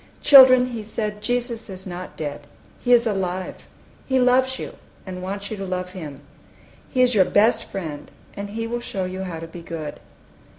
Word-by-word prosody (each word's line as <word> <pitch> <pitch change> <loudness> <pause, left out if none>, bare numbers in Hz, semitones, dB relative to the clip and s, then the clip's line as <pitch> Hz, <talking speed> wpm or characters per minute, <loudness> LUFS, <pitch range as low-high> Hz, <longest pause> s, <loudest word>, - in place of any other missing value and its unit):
"Children," 255 -3 +9
he 230 -2 -4
said, 210 0 -4
"Jesus 240 -1 -2
is 190 -1 -9
not 180 0 -7
dead. 145 -1 -5 0.4
He 245 - +1
is 240 -1 +6
alive: 190 -3 -3 0.4
He 260 -1 +2
loves 255 +1 +3
you, - - -6 0.3
and 185 -1 -6
wants 200 +2 -5
you 215 - -4
to 195 - -5
love 185 -1 -3
Him! 150 -7 -8 0.7
He 255 -2 +3
is 250 0 +3
your 195 -4 +5
best 215 +6 +3
Friend, 155 -6 -6 0.3
and 200 0 -5
He 225 +2 -4
will 240 +1 -3
show 190 -5 -3
you 185 +1 -5
how 175 -3 -5
to 165 - -6
be 165 +1 -10
good." 165 -3 -6
200 Hz, 185 wpm, -23 LUFS, 180-240 Hz, 0.7 s, Children